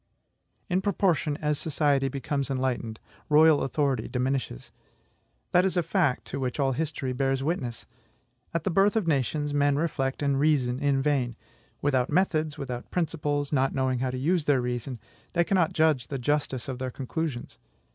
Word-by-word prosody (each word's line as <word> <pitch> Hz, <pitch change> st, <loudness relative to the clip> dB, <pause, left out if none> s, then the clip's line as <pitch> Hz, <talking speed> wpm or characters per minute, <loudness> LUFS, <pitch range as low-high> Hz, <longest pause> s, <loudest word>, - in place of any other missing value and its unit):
In 185 Hz, -1 st, +1 dB
proportion 180 Hz, -7 st, +1 dB
as 150 Hz, -1 st, +1 dB
society 145 Hz, -3 st, +1 dB
becomes 140 Hz, +1 st, -2 dB
enlightened, 130 Hz, -4 st, -2 dB, 0.3 s
royal 155 Hz, 0 st, +6 dB
authority 135 Hz, -4 st, 0 dB
diminishes. 130 Hz, -, -2 dB, 0.8 s
That 180 Hz, -, +5 dB
is 190 Hz, -1 st, 0 dB
a 175 Hz, -, +3 dB
fact 165 Hz, -5 st, +1 dB
to 140 Hz, -, -5 dB
which 130 Hz, +2 st, -3 dB
all 135 Hz, -1 st, +2 dB
history 140 Hz, -2 st, -2 dB
bears 135 Hz, +1 st, 0 dB
witness. 135 Hz, -7 st, -3 dB, 0.7 s
At 165 Hz, -2 st, -2 dB
the 190 Hz, -, 0 dB
birth 195 Hz, +5 st, +3 dB
of 220 Hz, -4 st, +1 dB
nations, 145 Hz, 0 st, 0 dB
men 145 Hz, 0 st, +3 dB
reflect 145 Hz, -3 st, -1 dB
and 140 Hz, -1 st, +1 dB
reason 135 Hz, -4 st, +2 dB
in 140 Hz, -2 st, +1 dB
vain. 135 Hz, -5 st, +1 dB, 0.5 s
Without 130 Hz, -3 st, +2 dB
methods, 160 Hz, -5 st, +1 dB
without 125 Hz, -4 st, -5 dB
principles, 150 Hz, -4 st, -1 dB
not 135 Hz, -1 st, +2 dB
knowing 130 Hz, -2 st, +1 dB
how 130 Hz, +1 st, 0 dB
to 130 Hz, -, -3 dB
use 160 Hz, +4 st, +1 dB
their 145 Hz, -3 st, +3 dB
reason, 125 Hz, 0 st, -3 dB, 0.3 s
they 175 Hz, -, +3 dB
cannot 175 Hz, -3 st, +2 dB
judge 155 Hz, -6 st, +2 dB
of -, -, -26 dB
the 140 Hz, -, -3 dB
justice 135 Hz, -1 st, -1 dB
of 130 Hz, -2 st, -4 dB
their 130 Hz, 0 st, -2 dB
conclusions. 135 Hz, +1 st, -4 dB
140 Hz, 165 wpm, -27 LUFS, 130-155 Hz, 0.8 s, royal